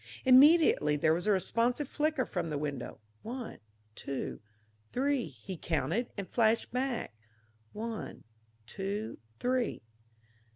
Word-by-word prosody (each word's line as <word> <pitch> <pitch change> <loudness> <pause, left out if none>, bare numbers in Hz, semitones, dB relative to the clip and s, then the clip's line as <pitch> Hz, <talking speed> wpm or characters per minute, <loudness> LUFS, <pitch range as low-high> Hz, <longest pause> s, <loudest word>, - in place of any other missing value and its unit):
Immediately 260 - +6
there 155 +2 +3
was 175 +5 -2
a - - +5
responsive 235 - +1
flicker 300 -3 0
from 175 -5 -3
the 150 - -2
window: 145 -3 -4 0.2
one, 245 0 -6 0.3
two, 135 +1 -5 0.5
three, 270 0 +1
he 130 - -8
counted, 165 - -1
and 200 -2 -4
flashed 225 -1 +2
back: 250 - -2 0.6
one, 225 +1 -6 0.4
two, 200 - -4 0.2
three. 250 - 0
220 Hz, 115 wpm, -31 LUFS, 165-255 Hz, 0.6 s, Immediately